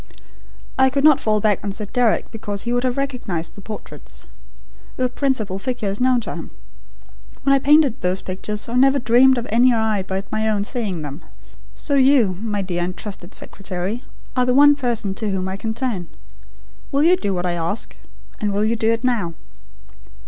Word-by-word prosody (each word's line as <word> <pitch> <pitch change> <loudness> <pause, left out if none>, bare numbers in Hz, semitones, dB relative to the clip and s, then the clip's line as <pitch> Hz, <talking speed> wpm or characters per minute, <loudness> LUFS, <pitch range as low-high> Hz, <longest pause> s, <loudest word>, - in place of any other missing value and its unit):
I 265 0 +6
could 275 +1 -1
not 305 -3 +6
fall 215 -1 +1
back 210 -1 +1
on 200 - -2
Sir 210 +2 -4
Deryck 235 +1 +1
because 205 -3 -5
he 240 - -1
would 245 0 +1
have 255 0 0
recognised 245 -12 -3
the 200 - -12
portraits. 150 - -8 0.7
The 255 -1 0
principal 245 -8 -1
figure 240 -2 -2
is 200 +4 -4
known 255 -1 +3
to - - -6
him. - - -7 0.9
When 275 - +4
I 275 - +4
painted 290 -2 +4
those 180 +1 -1
pictures 210 +3 -4
I 235 - -6
never 270 +2 +4
dreamed 255 +1 +5
of 240 - -2
any 245 +3 +5
eye 220 -3 +1
but 190 +1 -5
my 220 0 0
own 205 -2 +1
seeing 205 -7 -3
them. 145 +3 -7 0.5
So 285 - -4
you, 260 -9 +4
my 210 -3 -2
dear 175 -2 -2
and 180 +1 -4
trusted 195 -3 -5
secretary, 195 +4 -2 0.3
are 250 -1 +2
the 250 - +2
one 290 +1 +7
person 240 -7 -1
to 215 +1 -3
whom 190 -1 -2
I 190 - -3
can 220 +2 -4
turn. 225 -9 -2 0.8
Will 280 +1 +2
you 350 +3 +6
do 205 - -2
what 180 0 -2
I 180 - +1
ask? 175 +5 -2 0.4
And 210 -1 -1
will 205 +2 +1
you 225 +2 +1
do 220 -1 +1
it 230 +1 0
now?" 215 -10 0
220 Hz, 195 wpm, -21 LUFS, 195-255 Hz, 0.9 s, one